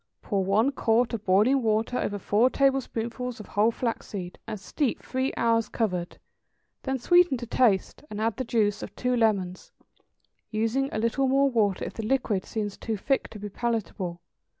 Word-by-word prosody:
= - - -55
Pour 200 -3 0
one 215 +8 +3
quart 235 -2 +1
of 220 -3 -3
boiling 215 +9 +4
water 225 +2 +1
over 205 - -2
four 210 +5 +3
tablespoonfuls 250 -3 -1
of 215 - -8
whole 210 +2 +3
flaxseed, 205 -6 -4
and 215 -2 -5
steep 250 +7 -2
three 260 +1 -1
hours 230 -1 +2
covered. 180 -6 -2 0.6
Then 265 0 -1
sweeten 350 +2 +4
to 240 - -6
taste, 230 -2 +1
and 210 - -6
add 220 -1 0
the 260 - -1
juice 210 -4 +1
of 200 - -8
two 250 0 0
lemons, 200 -6 0 0.8
using 225 +5 0
a - - -3
little 230 +5 +1
more 275 +1 +3
water 210 -5 +1
if - - -6
the - - -5
liquid 215 -5 0
seems 210 -2 -4
too 220 -2 -3
thick 270 +7 0
to - - -10
be 205 0 -6
palatable. 200 -5 -3
225 Hz, 175 wpm, -27 LUFS, 205-250 Hz, 0.8 s, boiling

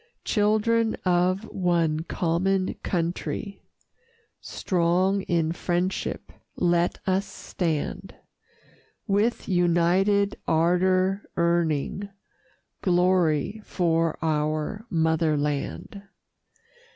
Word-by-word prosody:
Children 220 +1 +2
of 180 +2 +2
one 170 -4 +1
common 185 +3 0
country, 180 +3 -3 0.8
Strong 185 +2 0
in 165 -2 +1
friendship 175 +2 -2 0.2
let 175 0 +1
us 190 +1 0
stand, 170 -5 -4 0.9
With 210 +3 0
united 185 +3 +2
ardor 185 +4 +2
earning 170 +2 0 0.7
Glory 180 0 +2
for 165 -4 0
our 155 +7 -1
Mother 160 -2 +1
Land. 145 +7 -3
175 Hz, 70 wpm, -25 LUFS, 165-195 Hz, 0.9 s, Children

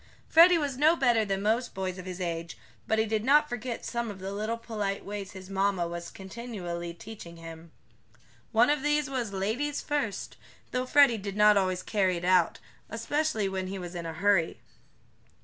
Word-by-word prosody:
Freddie 340 +2 +7
was 285 -5 -2
no 315 +3 +5
better 240 -7 +3
than 195 -1 -2
most 230 +3 0
boys 185 -1 -3
of 185 - -8
his 185 0 -6
age, 170 -2 -4 0.3
but 220 - +2
he 220 - +3
did 215 -1 -1
not 295 +4 +5
forget 245 -1 -5
some 235 -1 -2
of 205 - -7
the 190 +1 -5
little 215 +3 -2
polite 210 -4 -3
ways 205 -1 -6
his 190 -1 -10
mamma 195 -2 0
was 170 0 -6
continually 190 -5 -6
teaching 170 -1 -10
him. 165 0 -10 0.8
One 240 +4 +5
of 295 -2 0
these 295 -1 +1
was 245 -6 -2
"ladies 225 +10 -1
first," 285 -9 -2 0.3
though 255 0 -1
Freddie 275 -5 +5
did 200 0 -5
not 210 0 +6
always 185 -2 +1
carry 190 -4 +1
it 170 - -5
out, 180 -2 +3 0.3
especially 230 -2 -1
when 190 -1 -3
he 195 +1 -5
was 175 -1 -7
in 170 -1 -5
a 165 - -5
hurry. 180 -1 +2
205 Hz, 185 wpm, -28 LUFS, 185-240 Hz, 0.8 s, Freddie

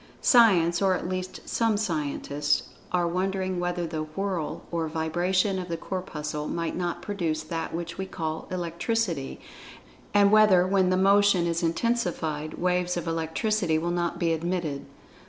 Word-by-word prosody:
Science, 180 -8 +5
or 190 -1 +3
at 180 - -4
least 185 0 -4
some 225 -2 +1
scientists, 150 -6 -1 0.2
are 175 -1 +2
wondering 185 +1 -1
whether 175 0 -1
the 160 -1 -3
"whirl" 165 +1 -3
or 165 -1 -1
vibration 180 +5 0
of 180 - -5
the 170 -1 -3
Corpuscle 150 -5 -4
might 165 -1 -2
not 175 -1 -3
produce 165 -6 -2
that 165 +1 -4
which 170 +1 -5
we 190 - -3
call 160 -3 -4
"Electricity," 175 - -2 0.7
and 200 -1 +5
whether, 210 -4 +6
when 190 -1 +2
this 185 - +2
motion 200 -2 +4
is 170 0 0
intensified, 165 -5 -1
waves 180 0 0
of 175 -1 -4
Electricity 165 +2 0
will 170 +2 -1
not 175 -1 -1
be 165 -2 +1
emitted. 165 -3 -2
175 Hz, 150 wpm, -27 LUFS, 165-190 Hz, 0.7 s, whether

